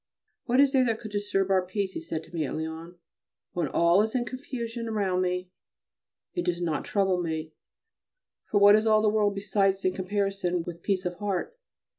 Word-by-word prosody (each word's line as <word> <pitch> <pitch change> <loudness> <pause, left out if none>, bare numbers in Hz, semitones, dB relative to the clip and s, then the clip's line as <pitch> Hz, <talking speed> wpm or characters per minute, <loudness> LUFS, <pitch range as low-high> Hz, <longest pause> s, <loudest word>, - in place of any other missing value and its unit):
"What 250 +1 +2
is 280 -1 +6
there 265 -2 +4
that 225 -2 0
could 215 - -8
disturb 205 -2 0
our 190 -1 +4
peace?" 190 +1 -2
he - - -6
said 160 0 -4
to 165 +2 -18
me 165 -2 -1
at 135 - -3
Lyons. 160 +2 -6 0.6
"When 175 - -1
all 170 +3 +4
is 220 +3 -1
in 245 -1 +1
confusion 240 -3 -5
around 195 -4 0
me 180 0 -2 0.8
it 350 - -1
does 175 -1 -1
not 165 -3 -1
trouble 190 -3 +1
me, 160 -2 -4 1.0
for 205 - +3
what 205 +1 +8
is 215 +1 +2
all 215 0 +4
the 215 - +4
world 210 -1 +2
besides 195 -1 +1
in 185 - +2
comparison 195 -2 -1
with 170 0 -8
peace 190 -1 -1
of 180 0 -3
heart?" 205 - -2
195 Hz, 195 wpm, -27 LUFS, 175-215 Hz, 1.0 s, what